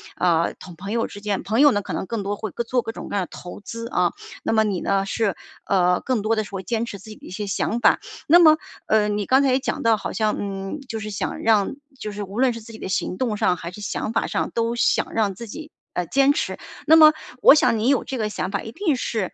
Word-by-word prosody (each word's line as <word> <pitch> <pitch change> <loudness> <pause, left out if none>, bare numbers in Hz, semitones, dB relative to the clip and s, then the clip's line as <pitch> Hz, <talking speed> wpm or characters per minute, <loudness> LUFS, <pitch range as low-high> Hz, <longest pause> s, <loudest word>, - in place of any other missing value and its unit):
啊， 170 -2 +2
同 180 -2 -11
朋 195 +5 -7
友 230 0 0
之 205 - -10
间 205 -1 -2
朋 220 +6 0
友 290 0 +7
呢， 205 -2 0
可 - - -8
能 - - -3
更 230 +1 -3
多 205 +1 -2
会 215 - -5 0.2
做 250 -1 +1
各 225 - -4
种 - - -8
各 - - -4
样 195 - +1
的 - - -7
投 180 - -9
资 230 +2 -7
啊， 180 -5 +1 0.3
那 - - 0
么 220 - +4
你 200 -4 -1
呢， 195 0 +1
是 205 -2 0 0.3
呃， 180 -2 +3
更 255 -5 0
多 220 +2 +1
的 215 - 0
是 210 - -12
会 195 -1 -4
坚 230 +3 -1
持 205 -3 -7
自 215 - -13
己 215 - -9
的 - - -16
一 - - -10
些 205 +3 -4
想 225 +4 -1
法。 - - +4 0.3
那 335 +4 +8
么， 310 -3 +7 0.3
呃， 215 -1 +3
你 205 0 -1
刚 265 +5 +4
才 270 - +3
也 260 - +3
讲 - - -3
到， 225 -1 +4
好 - - -5
像 215 -1 +1
嗯， 195 +6 -4
就 225 -3 -4
是 215 0 -5
想 200 - -3
让 215 -1 +3 0.3
就 210 - -5
是 205 - -6
无 200 +4 -6
论 255 -2 +3
是 230 - -8
自 225 - -12
己 220 - -10
的 - - -5
行 185 -1 -2
动 235 -5 -1
上， 180 - +2
还 170 +1 -7
是 210 +3 -10
想 215 +2 -3
法 225 - +1
上 - - -1
都 230 0 0
想 235 - +1
让 210 -3 +1
自 235 +2 -8
己， 310 +7 -9 0.2
呃， 180 - -1
坚 275 - +4
持。 - - -2 0.3
那 320 - +8
么 310 -1 +9 0.3
我 - - +9
想 230 - +3
你 230 - +2
有 275 - +3
这 265 - -5
个 215 -2 -1
想 190 - -3
法， 200 - -2
一 225 - -8
定 325 - 0
是 220 -6 -2
215 Hz, 300 characters per minute, -23 LUFS, 195-235 Hz, 0.3 s, 么